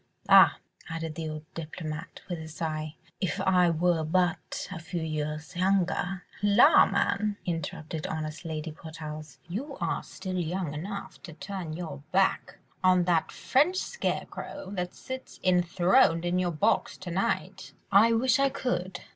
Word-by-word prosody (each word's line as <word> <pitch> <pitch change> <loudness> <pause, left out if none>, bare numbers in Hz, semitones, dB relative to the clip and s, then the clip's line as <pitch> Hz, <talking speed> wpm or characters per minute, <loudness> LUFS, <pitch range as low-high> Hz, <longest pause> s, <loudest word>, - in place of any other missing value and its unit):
Ah!" - - +8 0.3
added 165 -1 -4
the 160 0 -4
old 155 0 -6
diplomatist 160 0 -7
with 175 -3 -4
a 160 - -7
sigh, 155 -1 -4 0.2
"if 185 -1 -1
I 185 -2 +4
were 165 0 +2
but 175 +2 0
a 185 - -5
few 170 0 -4
years 155 +1 -4
younger.. 185 0 +1
." - - -19
"La, 205 0 +7
man!" 200 +1 0
interrupted 160 -2 -4
honest 155 +1 -4
Lady 160 -1 -4
Portarles, 155 -2 -8
"you 220 - -5
are - - -1
still 185 -2 -5
young 175 -2 -2
enough 195 +6 -6
to 170 - -9
turn 190 -2 -6
your 160 -4 -6
back 190 +1 +1 0.3
on 185 -1 +5
that 170 -2 +1
French 305 +8 +2
scarecrow 385 - -4
that 180 -3 -3
sits 260 0 -8
enthroned 175 -2 +4
in 175 +1 +1
your 180 -1 +1
box 200 +8 +1
to 185 -2 -7
night." 185 +3 -2 0.2
"I 210 +4 +7
wish 255 +4 +3
I 275 0 +4
could 190 -9 -2
175 Hz, 150 wpm, -28 LUFS, 160-190 Hz, 0.3 s, Ah